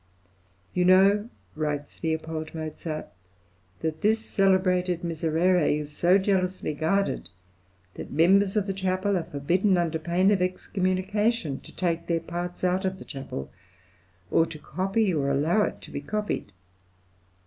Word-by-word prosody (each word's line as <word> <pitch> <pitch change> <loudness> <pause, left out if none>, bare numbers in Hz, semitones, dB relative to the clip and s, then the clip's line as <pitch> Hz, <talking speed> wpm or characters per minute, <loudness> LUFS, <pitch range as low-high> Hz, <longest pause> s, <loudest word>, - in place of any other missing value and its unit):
"You 180 - +2
know," 195 +4 +5 0.3
writes 150 -2 -3
L. 160 -1 +1
Mozart, 155 0 -5 0.7
"that 160 -1 -3
this 220 +2 +3
celebrated 185 -2 +2
Miserere 165 +1 +2
is 150 0 -8
so 180 +4 +4
jealously 185 -4 0
guarded, 170 +7 0 0.6
that - - -8
members 195 +5 +4
of 205 - +2
the 195 - -2
chapel 190 +1 0
are 175 - 0
forbidden, 180 +8 +1
under 165 -2 0
pain 175 +4 +2
of 195 -3 +2
excommunication, 185 - 0
to - - -15
take 170 -2 -1
their 170 -1 +1
parts 175 +2 -5
out 185 +1 +1
of 190 0 -1
the - - -11
chapel, 130 - -6 0.8
or 165 - +4
to 160 - -8
copy 190 +6 0
or 140 -3 0
allow 155 +9 +2
it - - -6
to - - -11
be 140 - -4
copied. 210 - -3
180 Hz, 140 wpm, -26 LUFS, 160-190 Hz, 0.8 s, know